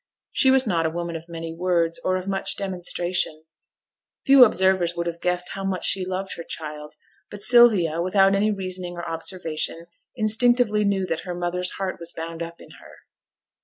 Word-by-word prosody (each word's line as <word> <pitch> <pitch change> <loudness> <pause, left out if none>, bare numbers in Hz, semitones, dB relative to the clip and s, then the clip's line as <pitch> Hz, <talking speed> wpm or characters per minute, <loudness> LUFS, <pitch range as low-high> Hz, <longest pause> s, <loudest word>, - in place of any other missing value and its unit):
She 265 - +3
was 265 0 +4
not 170 -6 +1
a - - -1
woman 170 +1 -4
of 165 +1 -8
many 165 -1 -6
words, 170 -1 0
or 185 0 +1
of 185 +1 -7
much 195 -1 -1
demonstration; 175 -4 -2 0.8
few 270 -1 +8
observers 190 -5 +2
would 170 - -3
have 170 0 -5
guessed 180 0 -1
how 195 - -6
much 190 -1 -2
she 185 -2 +1
loved 190 +1 -4
her 170 - -6
child; 150 -2 -8 0.3
but 205 -1 -7
Sylvia, 210 -10 +5
without 195 +2 +3
any 205 +2 +2
reasoning 185 -3 -4
or 175 -1 -6
observation, 165 -1 -2 0.3
instinctively 220 -1 +3
knew 195 -2 +1
that 165 -3 -2
her 180 -2 -6
mother's 175 +1 -2
heart 190 -1 -4
was 170 0 -1
bound 165 0 -7
up 170 0 -7
in - - -15
her. - - -16
180 Hz, 180 wpm, -23 LUFS, 170-195 Hz, 0.8 s, few